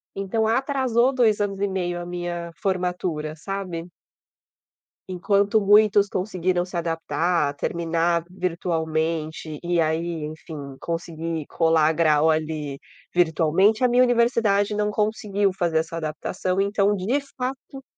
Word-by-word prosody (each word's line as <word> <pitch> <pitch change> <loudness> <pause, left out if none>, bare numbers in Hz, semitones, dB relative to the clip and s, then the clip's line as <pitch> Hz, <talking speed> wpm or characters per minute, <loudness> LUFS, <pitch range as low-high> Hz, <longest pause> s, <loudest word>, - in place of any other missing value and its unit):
Então 195 +3 -1
atrasou 260 0 +2
2 225 -5 +3
anos 200 -1 -1
e 200 - +2
meio 175 -2 -2
a 175 - -6
minha 175 -1 -4
formatura, 180 -5 -2
sabe. 180 -1 -5 1.2
Enquanto 200 +3 +2
muitos 205 0 +5
conseguiram 185 -2 -1
se 180 -1 -6
adaptar, 165 -1 0
terminar 170 +2 0
virtualmente 160 -3 -2
e 175 -1 +1
aí, 160 +1 -1
enfim, 155 +1 -8 0.2
conseguir 165 -2 -4
colar 160 -2 +3
grau 155 -1 +3
ali 155 -3 -2 0.3
virtualmente, 175 +6 +3
a - - +6
minha 245 +1 +5
universidade 230 -4 +2
não 210 0 0
conseguiu 210 -2 0
fazer 165 -2 +1
essa 165 +1 -4
adaptação, 180 +4 -2
então 200 0 +2
de 215 +9 0 0.2
fato 265 +1 -5
175 Hz, 120 wpm, -24 LUFS, 165-205 Hz, 1.2 s, a